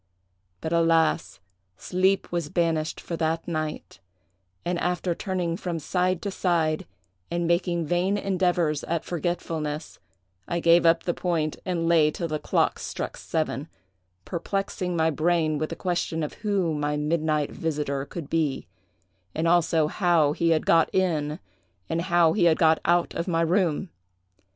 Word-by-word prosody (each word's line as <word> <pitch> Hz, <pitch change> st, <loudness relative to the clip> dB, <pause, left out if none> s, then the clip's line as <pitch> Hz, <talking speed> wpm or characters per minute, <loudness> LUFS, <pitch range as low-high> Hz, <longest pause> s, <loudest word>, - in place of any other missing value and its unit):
But, 160 Hz, -, -2 dB
alas! 165 Hz, -1 st, +2 dB, 0.4 s
sleep 190 Hz, +2 st, +1 dB
was 170 Hz, -4 st, -2 dB
banished 160 Hz, -2 st, 0 dB
for 170 Hz, -, -5 dB
that 160 Hz, 0 st, -1 dB
night; 155 Hz, -2 st, -4 dB, 0.7 s
and 175 Hz, 0 st, -1 dB
after 180 Hz, 0 st, 0 dB
turning 180 Hz, -2 st, -2 dB
from 175 Hz, -4 st, -3 dB
side 180 Hz, +3 st, 0 dB
to 200 Hz, -, -2 dB
side, 165 Hz, -5 st, 0 dB, 0.4 s
and 170 Hz, 0 st, -1 dB
making 170 Hz, 0 st, +1 dB
vain 180 Hz, +5 st, +1 dB
endeavors 180 Hz, -6 st, 0 dB
at 165 Hz, -1 st, -2 dB
forgetfulness, 160 Hz, -3 st, -3 dB, 0.5 s
I 170 Hz, -, -1 dB
gave 170 Hz, 0 st, +5 dB
up 165 Hz, 0 st, +4 dB
the 175 Hz, -, 0 dB
point, 165 Hz, -4 st, -1 dB
and 170 Hz, -2 st, 0 dB
lay 160 Hz, -3 st, +5 dB
till 170 Hz, +2 st, -3 dB
the 155 Hz, -1 st, -2 dB
clocks -, -, 0 dB
struck -, -, -4 dB
seven, 155 Hz, -2 st, -2 dB, 0.6 s
perplexing 180 Hz, 0 st, -2 dB
my 160 Hz, 0 st, +3 dB
brain 155 Hz, -1 st, +1 dB
with 155 Hz, -, -2 dB
the 165 Hz, -, -5 dB
question 170 Hz, -2 st, -2 dB
of 150 Hz, -, -4 dB
who 195 Hz, -6 st, 0 dB
my 150 Hz, 0 st, -1 dB
midnight 150 Hz, -1 st, 0 dB
visiter 150 Hz, -4 st, -2 dB
could 155 Hz, +1 st, -7 dB
be, 155 Hz, -4 st, -1 dB, 0.7 s
and 160 Hz, +2 st, 0 dB
also 165 Hz, -2 st, +3 dB
how 160 Hz, -3 st, +2 dB
he 170 Hz, +2 st, +1 dB
had 160 Hz, -1 st, +2 dB
got 165 Hz, -1 st, +4 dB
in 155 Hz, -5 st, +1 dB, 0.5 s
and 165 Hz, -, -1 dB
how 170 Hz, -2 st, +3 dB
he 185 Hz, -5 st, +2 dB
had 160 Hz, -2 st, +4 dB
got 160 Hz, -1 st, +4 dB
out 175 Hz, 0 st, +2 dB
of 170 Hz, -, -3 dB
my 165 Hz, -2 st, +1 dB
room. 170 Hz, 0 st, +1 dB
165 Hz, 150 wpm, -26 LUFS, 155-175 Hz, 0.7 s, gave